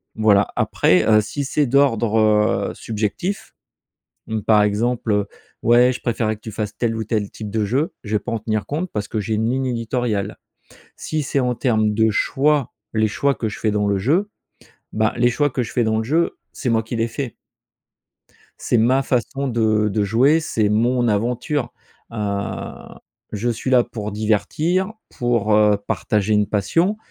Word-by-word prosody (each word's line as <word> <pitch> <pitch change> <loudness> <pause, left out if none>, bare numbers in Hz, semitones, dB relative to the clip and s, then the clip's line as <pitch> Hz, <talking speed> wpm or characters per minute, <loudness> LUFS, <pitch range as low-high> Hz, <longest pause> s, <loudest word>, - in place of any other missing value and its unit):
Voilà, 105 -2 +4
après, 90 -1 +2
heu, 110 -1 +5
si 140 +7 -4
c'est 145 +2 +1
d'ordre, 120 -4 +2 0.5
heu, - - -9
subjectif, 110 - -3 0.7
mmh, 110 -1 -2
par 105 0 +4
exemple, 115 +2 0
heu: 105 -1 +1 0.4
«Ouais 120 +2 +5
je 125 - -8
préférais 115 -2 -1
que - - -33
tu 110 - -7
fasses 105 0 -4
tel 115 -2 0
ou 110 - -2
tel 105 -2 -2
type 105 -2 -8
de 110 0 0
jeu» 135 - 0
je 105 -1 -2
vais - - +3
pas 125 - -6
en 115 - -1
tenir 110 -1 -2
compte, 165 +6 -3
parce 105 -1 -3
que 110 - -3
j'ai 110 +1 -2
une 110 +2 0
ligne 130 +1 0
éditoriale. 115 -4 -2 0.6
Si 155 -1 -3
c'est 140 - -1
en 125 -1 0
termes 110 -4 +1
de 110 +1 +3
choix, 145 +4 +1 0.2
les 110 -1 +2
choix 140 +6 +1
que 110 - -3
je - - -7
fais 110 - +1
dans 105 0 0
le 100 -1 +1
jeu, 160 - +1 0.6
bah, 110 0 +1
les 120 0 +3
choix 145 +4 +1
que 125 0 -1
je - - -6
fais 120 - +1
dans 110 0 +1
le 110 - -1
jeu, 160 +8 0 0.2
c'est 130 - -4
moi 115 -1 +2
qui 115 +2 -5
les 115 - +1
fait 120 +1 -5 1.2
c'est 120 - 0
ma 130 +4 +3
façon 135 +2 -1
de 110 -3 +1
de 105 +1 0
jouer, 125 +10 +3
c'est 110 -9 0
mon 120 +3 +2
aventure. 120 +6 -1 0.4
Heu, 100 -3 -3 0.6
je 110 +3 -1
suis 120 +3 -3
là 125 -2 +5
pour 110 -3 -6
divertir, 155 - 0 0.2
pour, 115 -4 +1
heu, 105 -1 +4
partager 105 -2 0
une 105 -1 +2
passion, 165 - +1
115 Hz, 185 wpm, -21 LUFS, 105-125 Hz, 1.2 s, heu